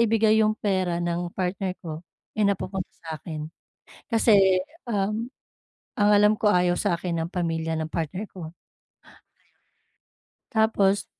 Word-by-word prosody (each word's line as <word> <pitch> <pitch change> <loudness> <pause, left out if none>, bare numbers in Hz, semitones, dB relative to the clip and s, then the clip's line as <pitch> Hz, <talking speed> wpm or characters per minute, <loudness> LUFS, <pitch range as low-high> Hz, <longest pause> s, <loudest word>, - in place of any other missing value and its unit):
ibigay 220 -1 +4
yung 215 0 +2
pera 185 -4 0
ng 175 0 -2
partner 185 0 -2
ko 160 -2 -6 0.4
eh, 210 - +2
napupunta 195 -1 -2 0.2
sa 160 -1 -5
akin 155 -2 -6 0.6
kasi 195 -5 +5 0.2
ang 215 +2 -2 0.6
alam 210 0 +5
ko, 210 - +3
ayaw 180 -2 +3
sa'kin 170 0 -1
ng 165 - -3
pamilya 165 -2 -1
ng 160 - -2
partner 175 +6 -3
ko, 170 -4 -8
ayun. - - -19 2.0
Tapos, 205 -3 +2
190 Hz, 125 wpm, -25 LUFS, 170-210 Hz, 2.0 s, kasi